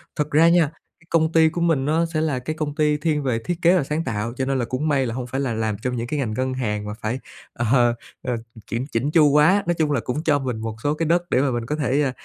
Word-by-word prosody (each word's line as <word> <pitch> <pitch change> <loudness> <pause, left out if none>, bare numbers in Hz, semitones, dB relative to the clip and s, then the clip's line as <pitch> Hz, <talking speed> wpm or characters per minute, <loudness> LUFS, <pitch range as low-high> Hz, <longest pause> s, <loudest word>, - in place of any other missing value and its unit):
Thật 150 0 -2
ra 160 +3 +5
nha, 170 -3 +3 0.3
cái 165 - -25
công 160 -1 +2
ty 160 -1 +5
của 170 +2 -4
mình 160 -6 +2
nó 160 +3 +2
sẽ 155 - +1
là 145 -5 0
cái 155 +5 -4
công 150 -2 -3
ty 150 -1 +2
thiên 150 -1 0
về 120 -4 0
thiết 170 +9 -3
kế 175 +2 +5
và 160 - +1
sáng 150 +4 -2
tạo, 115 -1 -3
cho 130 - -1
nên 135 -1 0
là 120 - 0
cũng 135 +6 -2
may 140 -3 +2
là 115 - -3
hông 125 -1 -4
phải 135 +3 -2
là 125 -4 -1
làm 110 -1 -1
trong 125 +2 -3
những 120 0 -3
cái 150 +3 -2
ngành 115 -6 -2
ngân 130 +3 -1
hàng 105 -5 -2
mà 105 - -4
phải, 110 +4 -4 0.3
ờ, 120 - -2
ờ, 120 -2 +4 0.3
ừ, 125 -1 -1 0.3
kiểm 120 +3 -2
chỉn 125 +6 0
chu 155 -2 +5
quá. 160 +8 +4
Nói 175 - +3
chung 155 -2 +1
là 140 - +1
cũng 140 +7 -3
cho 150 -3 +2
mình 125 -4 -3
một 110 -1 -4
số 145 +1 +2
cái 165 +2 -2
đất 170 +2 +2
để 130 - +3
mà 135 -2 +1
mình 120 -1 -2
có 150 - -2
thể, 145 -1 +1
ờ, 135 - +1
140 Hz, 305 wpm, -22 LUFS, 125-155 Hz, 0.3 s, ra